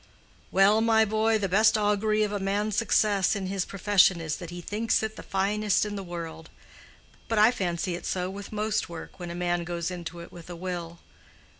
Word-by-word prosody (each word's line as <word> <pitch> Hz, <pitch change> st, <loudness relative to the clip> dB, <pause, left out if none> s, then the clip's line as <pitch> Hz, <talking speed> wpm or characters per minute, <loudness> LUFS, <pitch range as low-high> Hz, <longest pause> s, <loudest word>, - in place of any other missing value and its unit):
"Well, 205 Hz, +3 st, +4 dB
my 225 Hz, -1 st, +4 dB
boy, 220 Hz, +1 st, +2 dB
the 200 Hz, -2 st, -1 dB
best 215 Hz, +4 st, +4 dB
augury 215 Hz, +1 st, +2 dB
of 210 Hz, -, -1 dB
a 205 Hz, -, -2 dB
man's 200 Hz, +2 st, -1 dB
success 210 Hz, -3 st, +2 dB
in 195 Hz, -2 st, -3 dB
his 190 Hz, -1 st, -2 dB
profession 195 Hz, -2 st, +3 dB
is 160 Hz, -2 st, -3 dB
that 175 Hz, -, -8 dB
he 175 Hz, 0 st, -7 dB
thinks 215 Hz, +6 st, 0 dB
it 220 Hz, 0 st, -3 dB
the -, -, -8 dB
finest 205 Hz, +2 st, +1 dB
in 205 Hz, -1 st, -4 dB
the 200 Hz, -, -4 dB
world. 165 Hz, -3 st, -7 dB, 0.8 s
But 225 Hz, -, -1 dB
I 215 Hz, +3 st, +6 dB
fancy 180 Hz, -5 st, -2 dB
it 175 Hz, -, -5 dB
so 180 Hz, -1 st, -1 dB
with 195 Hz, +1 st, -8 dB
most 215 Hz, -1 st, -1 dB
work 170 Hz, +2 st, -9 dB
when 175 Hz, -1 st, -6 dB
a 170 Hz, -, -6 dB
man 175 Hz, 0 st, -1 dB
goes 170 Hz, 0 st, -3 dB
into 175 Hz, -1 st, -7 dB
it 170 Hz, -, -10 dB
with 170 Hz, 0 st, -12 dB
a 175 Hz, -, -6 dB
will. 170 Hz, -1 st, -6 dB
195 Hz, 205 wpm, -27 LUFS, 175-215 Hz, 0.8 s, I